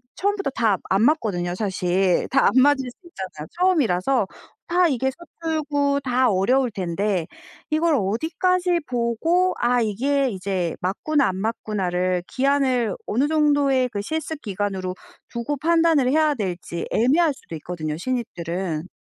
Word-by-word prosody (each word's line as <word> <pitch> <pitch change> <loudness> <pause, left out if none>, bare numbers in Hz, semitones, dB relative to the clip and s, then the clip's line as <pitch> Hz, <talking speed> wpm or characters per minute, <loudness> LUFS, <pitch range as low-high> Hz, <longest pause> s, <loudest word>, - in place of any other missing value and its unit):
처음부터 405 -3 0
다 220 -4 +2
안 195 +3 +3
맞거든요 210 - +1
사실. 185 -2 0
다 270 +1 +4
안 - - +4
맞을 270 -1 +3
수 245 - -16
있잖아요 190 - -8
처음이라서 270 - +2 0.4
다 355 +1 +3
이게 265 -1 0 0.3
서툴고 290 -3 0
다 255 -1 +2
어려울 240 +6 +2
텐데 185 -1 -1 0.4
이걸 315 +1 +2
어디까지 340 - 0
보고 255 +10 +1
아 245 +1 +2
이게 265 +6 +1
이제 185 -4 -2
맞구나 275 +10 +1
안 185 - -4
맞구나를 185 -4 -1
기한을 260 -5 +1
어느 260 +7 +1
정도의 285 -4 +3
그 205 -3 -4
실습 315 +5 -4
기간으로 195 -3 -3 0.3
두고 235 +5 -3
판단을 325 -3 +3
해야 310 0 +3
될지 180 -5 -4
애매할 295 +7 +3
수도 170 - -10
있거든요 155 -1 -5
신입들은. 180 -7 -3
245 Hz, 305 characters per minute, -23 LUFS, 190-295 Hz, 0.4 s, 다